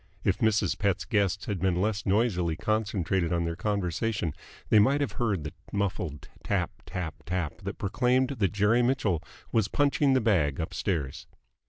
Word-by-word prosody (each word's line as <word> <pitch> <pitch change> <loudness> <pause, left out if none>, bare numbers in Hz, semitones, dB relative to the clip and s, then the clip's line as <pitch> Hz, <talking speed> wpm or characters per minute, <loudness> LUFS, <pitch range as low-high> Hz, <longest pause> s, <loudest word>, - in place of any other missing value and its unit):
If 95 - +1
Mrs. 105 -6 +2
Pett's 95 -3 +1
guests 100 -3 +1
had 100 -3 -2
been 90 0 +1
less 105 +2 -1
noisily 95 -5 +2
concentrated 95 -4 0
on 85 -1 +1
their 85 0 -2
conversation, 100 -2 -1 0.4
they 110 - +6
might 135 +7 +4
have 145 - 0
heard 105 -9 -1
the 75 - -6 0.2
muffled 95 -7 -2 0.2
tap - - 0 0.2
tap 85 -4 -5
tap 90 -2 -2
that 100 +1 -5
proclaimed 125 +5 +2
that 110 -9 0
Jerry 105 +4 +3
Mitchell 120 - +1 0.3
was 110 -3 +2
punching 140 +3 +2
the 130 - +4
bag 85 - +2
upstairs. 80 -4 -2
100 Hz, 160 wpm, -28 LUFS, 85-110 Hz, 0.4 s, they